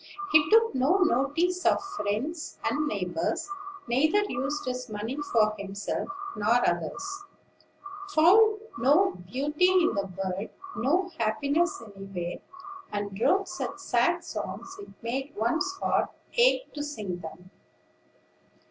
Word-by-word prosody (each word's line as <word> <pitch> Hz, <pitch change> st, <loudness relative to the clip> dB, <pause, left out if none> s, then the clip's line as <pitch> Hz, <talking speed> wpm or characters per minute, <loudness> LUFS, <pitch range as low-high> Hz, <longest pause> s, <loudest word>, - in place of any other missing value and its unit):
He 300 Hz, -1 st, +5 dB
took 455 Hz, +1 st, +5 dB
no 270 Hz, +8 st, +3 dB
notice 330 Hz, +7 st, +1 dB
of -, -, +4 dB, 0.2 s
friends 275 Hz, -, -3 dB
and 300 Hz, +1 st, 0 dB
neighbors; 185 Hz, -, -2 dB, 0.4 s
neither 310 Hz, +12 st, +3 dB
used 275 Hz, +3 st, -2 dB
his 250 Hz, -1 st, -4 dB
money 215 Hz, +4 st, -4 dB, 0.2 s
for 215 Hz, -2 st, +4 dB
himself 200 Hz, -, -4 dB, 0.3 s
nor 230 Hz, +4 st, +3 dB
others; 390 Hz, -, -2 dB, 0.9 s
found 410 Hz, +6 st, +6 dB, 0.2 s
no 300 Hz, +11 st, +4 dB
beauty 290 Hz, -, 0 dB
in 365 Hz, -2 st, +4 dB
the 200 Hz, -1 st, -1 dB
world, 190 Hz, +1 st, -3 dB, 0.3 s
no 355 Hz, +10 st, +1 dB
happiness 280 Hz, +7 st, +1 dB
anywhere; 195 Hz, -3 st, -5 dB, 0.5 s
and 205 Hz, -1 st, -3 dB
wrote 390 Hz, +8 st, +3 dB
such 360 Hz, 0 st, -4 dB
sad -, -, +1 dB
songs 385 Hz, -, -6 dB
it 400 Hz, -, -9 dB
made 265 Hz, +5 st, -3 dB
one's 245 Hz, -, 0 dB
heart 390 Hz, -, 0 dB, 0.3 s
ache -, -, +3 dB
to 295 Hz, -, -4 dB
sing 210 Hz, -12 st, -4 dB
them. 175 Hz, +3 st, -10 dB
270 Hz, 120 wpm, -28 LUFS, -, 0.9 s, found